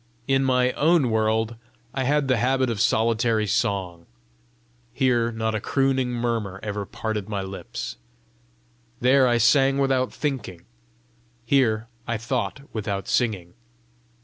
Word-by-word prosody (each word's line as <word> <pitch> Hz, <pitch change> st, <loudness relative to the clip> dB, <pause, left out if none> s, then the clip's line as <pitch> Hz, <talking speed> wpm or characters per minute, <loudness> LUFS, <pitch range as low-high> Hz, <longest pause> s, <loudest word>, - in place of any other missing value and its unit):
In 135 Hz, 0 st, +2 dB
my 125 Hz, -1 st, +2 dB
own 150 Hz, -4 st, +2 dB
world 110 Hz, +1 st, 0 dB, 0.4 s
I 130 Hz, -1 st, -1 dB
had 145 Hz, +1 st, +2 dB
the 130 Hz, -2 st, +2 dB
habit 130 Hz, +1 st, +1 dB
of 110 Hz, -2 st, -2 dB
solitary 115 Hz, -1 st, +2 dB
song; 95 Hz, -5 st, -1 dB, 0.9 s
here 120 Hz, -3 st, +2 dB
not 110 Hz, -1 st, -2 dB
a 110 Hz, -, -1 dB
crooning 135 Hz, -2 st, +1 dB
murmur 115 Hz, -5 st, -2 dB
ever 105 Hz, -2 st, -4 dB
parted 110 Hz, -2 st, -4 dB
my 100 Hz, -2 st, -2 dB
lips! 60 Hz, -10 st, -6 dB, 1.0 s
There 130 Hz, +1 st, +4 dB
I 120 Hz, -1 st, +3 dB
sang 135 Hz, +4 st, +4 dB
without 135 Hz, -2 st, +1 dB
thinking; 125 Hz, -, -4 dB, 0.8 s
here 115 Hz, -4 st, +2 dB, 0.2 s
I 115 Hz, -1 st, -1 dB
thought 125 Hz, +4 st, -3 dB
without 100 Hz, -3 st, -3 dB
singing! 100 Hz, -8 st, 0 dB
115 Hz, 125 wpm, -24 LUFS, 110-130 Hz, 1.0 s, There